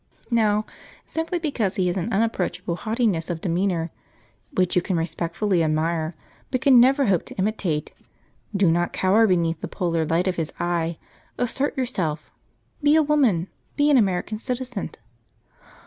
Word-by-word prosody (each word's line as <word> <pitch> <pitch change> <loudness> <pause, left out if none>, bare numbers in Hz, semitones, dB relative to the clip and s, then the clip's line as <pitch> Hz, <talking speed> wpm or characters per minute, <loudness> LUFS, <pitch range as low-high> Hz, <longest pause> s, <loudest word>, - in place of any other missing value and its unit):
Now, 215 -2 +2 0.4
simply 325 +2 -2
because 275 - -1
he 185 - +1
has 175 0 0
an 195 +4 -2
unapproachable 195 -5 -1
haughtiness 215 -5 -1
of 170 -2 -2
demeanour, 175 -1 -1 0.6
which 185 -9 +1
you 180 - +4
can 180 0 -1
respectfully 170 +2 0
admire, 160 +1 0 0.3
but 255 - -1
can 270 -4 +7
never 270 +3 +5
hope 190 -6 +2
to - - -10
imitate, 190 -6 -1 0.6
do 190 -4 +4
not 175 +1 0
cower 210 +4 +4
beneath 170 -3 +1
the - - -3
polar 170 -4 -1
light 165 +4 +1
of 185 - -1
his 165 -2 -2
eye; 170 -1 -1 0.4
assert 265 +4 -1
yourself; 180 - -2 0.5
be 295 +1 +4
a 315 - +5
woman; 260 - +2 0.3
be 295 0 +3
an 280 - +6
American 205 0 0
citizen!' 250 -3 -4
190 Hz, 150 wpm, -24 LUFS, 170-240 Hz, 0.6 s, can